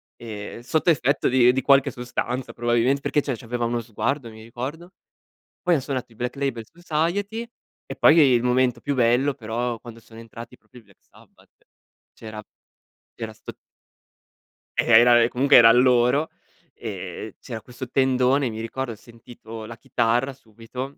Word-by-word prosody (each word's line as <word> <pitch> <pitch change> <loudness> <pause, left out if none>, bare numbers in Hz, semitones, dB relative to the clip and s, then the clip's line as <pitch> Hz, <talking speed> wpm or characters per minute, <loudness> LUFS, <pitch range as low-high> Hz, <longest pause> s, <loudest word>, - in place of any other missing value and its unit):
e 110 0 -8
sotto 160 +6 +1
effetto 140 -2 +2
di 125 -1 +5
di 135 - 0
qualche 135 -1 +4
sostanza 125 0 -4
probabilmente, 120 +3 +1
perché 150 - 0
cioè, 135 -3 -3
c'aveva 120 +1 -3
uno 120 0 -1
sguardo, 120 +3 -3
mi 110 0 -13
ricordo. 140 - -7 0.7
Poi 180 -2 +2
han 145 - +1
suonato 130 -3 -5
i - - -19
Black 125 +3 -4
Label 135 -5 -3
Society. 175 +7 -2 0.4
E - - -7
poi, 160 - +6
il 130 -6 +5
momento 125 -1 +1
più 145 -1 -2
bello 125 +3 +2
però, 120 0 -3
quando 115 0 -12
sono 115 0 -16
entrati 115 +2 -11
proprio 125 -1 -18
i - - -27
Black 100 -2 -26
Sabbath - - -23 0.6
c'era 110 -1 -9 0.7
c'era 110 -2 -7
'sto - - -10 1.3
Eh - - +2
era 120 -1 +5
comunque 135 +3 +4
eran 115 +1 +7
loro. 125 +4 +3 0.4
E - - -7
c'era 110 -1 -7
questo 125 0 -9
tendone, 130 0 +2
mi 110 0 -7
ricordo. 120 +2 -4
Ho - - -11
sentito 115 0 -12
la 115 +1 -10
chitarra 120 +5 0
subito. 125 +3 -9
125 Hz, 155 wpm, -23 LUFS, 115-135 Hz, 1.3 s, eran